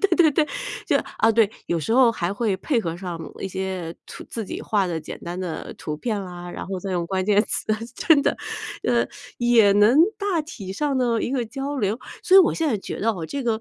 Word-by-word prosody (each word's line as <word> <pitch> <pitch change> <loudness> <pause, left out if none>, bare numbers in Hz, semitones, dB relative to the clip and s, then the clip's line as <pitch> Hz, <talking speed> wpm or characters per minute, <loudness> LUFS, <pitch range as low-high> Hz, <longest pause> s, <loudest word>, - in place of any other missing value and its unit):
对 400 - +3
对 320 -3 +6
对， 300 +2 +2 0.4
就 - - +2 0.2
啊 225 0 +4
对， 220 -2 +4 0.2
有 170 -1 0
时 150 - -4
候 245 -1 +6
还 175 -4 -2
会 210 -1 0
配 260 +4 0
合 165 -4 -3
上 175 -2 -5 0.2
一 195 - -3
些 185 -3 -4
图 - - -9
自 225 -2 -4
己 - - -6
画 200 -3 +1
的 165 -2 -2
简 - - -8
单 175 +2 -5
的 175 -3 -5
图 150 -1 -4
片 210 +2 -2
啦， 175 -1 -8
然 - - -6
后 190 -1 -3
再 190 +1 -4
用 175 -2 -1
关 185 +1 -1
键 210 0 +4
词， - - -2 0.3
真 320 -4 +4
的 - - +1 0.5
呃， - - +2 0.3
也 235 -4 +5
能 210 +5 +5 0.2
大 400 -6 0
体 210 -11 -8
上 280 +4 0
呢， 235 -3 +1
一 - - -1
个 250 -4 -1
交 275 +5 -4
流。 210 0 0 0.2
所 375 - +6
以 - - +11
我 355 - +4
现 325 -2 0
在 235 - +1
觉 195 - -6
得 225 +2 +2
哦， 175 -6 -4
这 280 - -4
个 230 -3 0
215 Hz, 250 characters per minute, -23 LUFS, 185-255 Hz, 0.5 s, 以